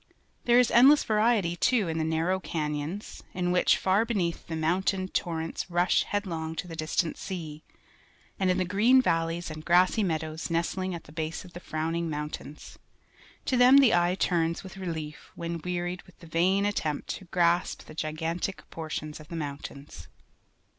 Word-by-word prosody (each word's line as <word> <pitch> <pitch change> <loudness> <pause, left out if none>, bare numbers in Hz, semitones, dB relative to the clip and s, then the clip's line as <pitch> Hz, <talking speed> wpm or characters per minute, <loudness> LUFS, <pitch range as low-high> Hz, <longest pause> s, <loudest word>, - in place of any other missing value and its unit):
There 240 0 +5
is 250 -1 +4
endless 275 +5 +7
variety, 215 -5 +2
too, 225 +1 +2
in 160 0 -2
the - - +1
narrow 165 +4 0
can3'ons, 155 +3 -4
in 180 -1 0
which, 180 - +4
far 190 +3 +2
beneath, 195 -8 -2
the 165 - -4
moimtain 185 +4 0
torrents 165 -1 -2
rush 175 +1 +2
headlong 165 -6 -3
to 180 - -4
the 165 - -7
distant 160 +1 -1
sea, 160 -5 -6 0.8
and 190 -1 +2
in 180 - +2
the 185 - +1
green 215 +8 +4
valleys 165 -6 0
and 155 0 -8
grassy 180 +6 +4
meadows 160 -3 -2
nestling 175 +2 -1
at 170 - -8
the - - -15
base 160 +1 -4
of 175 - -14
the 175 - -7
frowning 165 0 -2
mountains. 150 0 -6 0.7
To 260 - +1
them 250 +2 +7
the 270 -5 +6
eye 175 +1 +3
turns 170 -3 0
with 190 - -10
relief 160 -5 -6
when 170 -1 -4
wearied 175 0 -3
with 180 - -19
the - - -14
vain 180 +5 +2
attempt 160 -8 -2
to 190 - -14
grasp 175 0 +1
the - - -12
gigantic 165 +4 -3
proportions 155 -1 -6
of 155 - -13
the 170 - -7
mountains. 140 -2 -7
170 Hz, 170 wpm, -28 LUFS, 160-190 Hz, 0.8 s, endless